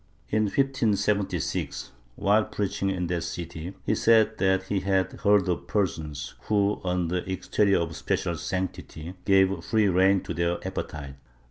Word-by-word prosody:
In 110 0 +2
1576, 105 -5 0 0.2
while 105 +2 +3
preaching 100 -1 -2
in 90 -2 -1
that 85 0 -1
city, 85 +1 -6
he - - +2
said 110 0 +4
that 95 -1 +2
he 95 +1 -1
had 95 0 +1
heard 100 -2 +3
of 90 - -2
persons 75 -9 -2
who, 105 -1 +1
under 90 -1 0
an 90 - -5
exterior 100 +2 +2
of 80 -1 -2
special 85 +4 -1
sanctity, 90 -1 -4
gave 95 0 +3
free 110 -2 +2
rein 95 +2 +4
to - - -5
their 85 +1 0
appe 95 0 -4
tites. 70 -2 -8
95 Hz, 150 wpm, -26 LUFS, 85-100 Hz, 0.2 s, said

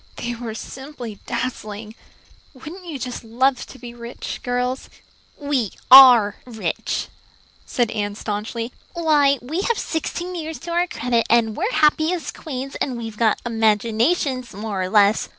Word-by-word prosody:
"They 240 0 -4
were 230 -2 -6
simply 255 -4 -8
dazzling. 220 -3 -4 0.6
Wouldn't 340 +8 -10
you 310 -4 -4
just 250 -2 -5
love 255 +4 +1
to - - -12
be 240 0 -9
rich, 235 0 -7
girls?" 250 +1 -2 0.5
"We 280 -8 -1 0.2
are 245 -6 +9
rich," 230 -3 -3 0.6
said 240 -3 0
Anne 205 -2 -2
staunchly. 220 +3 -4 0.2
"Why, 300 -5 +3
we 315 +9 -2
have 465 +2 0
sixteen 345 +3 -3
years 320 -2 -5
to 340 +1 -6
our 350 +1 +2
credit, 235 -6 0
and 225 -2 +3
we're 400 +8 -1
happy 315 -3 +3
as 345 -3 -4
queens, 270 -2 -6
and 255 -3 -1
we've 225 -2 -6
all 230 - +5
got 215 - +1
imaginations, 235 - +1
more 205 -2 -3
or 185 - -2
less. 205 +1 +4
245 Hz, 150 wpm, -22 LUFS, 225-290 Hz, 0.6 s, are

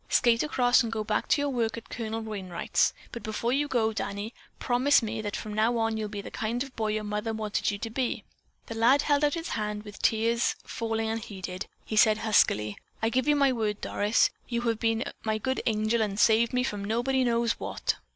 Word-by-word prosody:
Skate 235 -1 +4
across 250 -5 +3
and 230 -2 -2
go 220 -1 -2
back 210 0 -1
to 285 - +3
your 285 - 0
work 230 -3 -1
at 230 - -10
Colonel 225 -1 -3
Wainright's, 195 -5 0 0.2
but 235 - -6
before 225 +3 -1
you 290 +2 +1
go, 225 -5 +1
Danny, 205 +2 -4 0.2
promise 255 +2 +3
me 220 0 -3
that 205 -1 -4
from 215 - -5
now 225 +3 +2
on 225 -1 +1
you'll 215 -1 -3
be 205 -1 -5
the - - -9
kind 235 +3 -2
of 275 - -9
a - - -26
boy 220 -3 -2
your 215 0 -1
mother 210 +2 -2
wanted 215 -2 -1
you 205 - -2
to 225 - -5
be." 255 +1 -2 0.4
The - - -6
lad 240 +6 +4
held 290 0 +2
out 290 +1 +3
his 330 0 -4
hand 210 -1 -1
and, 210 0 -6
with 210 0 -10
tears 230 +1 +2
falling 225 -1 -2
unheeded, 195 -4 -5 0.2
he 220 - -4
said 215 0 +5
huskily: 105 - +2 0.2
"I 225 - +1
give 260 +3 0
you 295 - +5
my 280 -2 +4
word, 215 -3 -1
Doris. 210 +3 +2 0.2
You've 235 -2 -1
been 225 0 +1 0.2
my 220 -1 0
good 260 +5 -1
angel 220 +1 +1
and 205 -1 -1
saved 230 +1 +4
me 250 0 +1
from 205 -5 -3
nobody 245 +5 +1
knows 235 -1 +1
what." - - -2
225 Hz, 220 wpm, -28 LUFS, 215-240 Hz, 0.4 s, said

